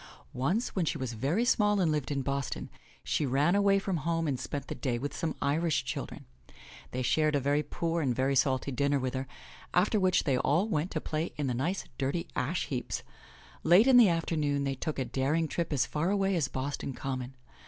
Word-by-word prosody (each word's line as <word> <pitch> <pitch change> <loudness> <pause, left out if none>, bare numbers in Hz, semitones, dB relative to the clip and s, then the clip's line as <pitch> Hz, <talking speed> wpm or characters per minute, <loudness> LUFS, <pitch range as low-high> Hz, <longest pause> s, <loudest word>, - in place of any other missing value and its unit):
Once, 165 - 0
when 185 - +1
she 160 - -1
was 130 -4 -4
very 145 - 0
small 210 -4 +3
and 170 -4 +2
lived 150 -3 -1
in 140 -2 -1
Boston, 140 -1 -3 0.3
she - - 0
ran 140 +5 +2
away 200 0 +4
from 195 -2 -1
home 165 +1 -1
and 135 -4 -1
spent 140 +1 -4
the - - -5
day 125 -4 -2
with 145 +4 -4
some 160 -2 -2
Irish 160 +3 +1
children. - - -5 0.6
They 130 +1 -3
shared 155 +4 +2
a - - +3
very 145 +2 +1
poor 165 +2 -2
and 130 -5 0
very 135 +2 +1
salty 135 0 +1
dinner 140 +2 +1
with 130 -1 -2
her, 130 0 -3 0.5
after 205 +4 +3
which 185 -2 +3
they 130 -3 +1
all 170 +9 +2
went 170 -4 -1
to 155 - -3
play 155 +2 -3
in 145 - -1
the 130 - 0
nice, 165 +11 -1 0.2
dirty, 140 +5 -1
ash 150 +7 -1
heaps. 125 -5 -3 0.6
Late 175 +7 +6
in 260 -2 +7
the 230 -5 +8
afternoon 155 -4 0
they 135 -1 0
took 150 +3 -4
a 130 - -1
daring 150 +6 0
trip 165 +2 -2
as 135 -3 +2
far 155 +6 -1
away 195 -1 +1
as 155 -5 +1
Boston 135 0 -4
Common. 130 0 -4
150 Hz, 210 wpm, -30 LUFS, 135-170 Hz, 0.6 s, the